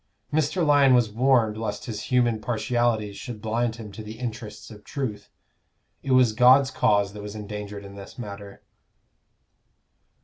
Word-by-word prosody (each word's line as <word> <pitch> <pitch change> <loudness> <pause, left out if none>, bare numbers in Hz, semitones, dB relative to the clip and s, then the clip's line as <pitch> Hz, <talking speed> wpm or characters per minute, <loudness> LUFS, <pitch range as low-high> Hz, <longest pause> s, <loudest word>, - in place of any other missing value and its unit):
Mr. 155 +3 +1
Lyon 140 -3 +5
was 120 -3 +2
warned 115 -2 +2
lest 105 -2 -4
his 110 -4 -5
human 120 -3 +2
partialities 115 -2 0
should 120 -4 -7
blind 115 +2 -1
him 110 -3 -9
to 110 - -9
the 110 +1 -9
interests 115 -2 -7
of 105 -1 -13
truth: 110 -8 -5 0.7
it 135 - -1
was 125 -4 +5
God's 130 +4 +5
cause 100 -6 +2
that 105 - -8
was 105 0 -7
endangered 105 -1 -7
in 100 - -10
this 100 +5 -11
matter. 100 -4 -9
110 Hz, 150 wpm, -25 LUFS, 105-125 Hz, 0.7 s, Lyon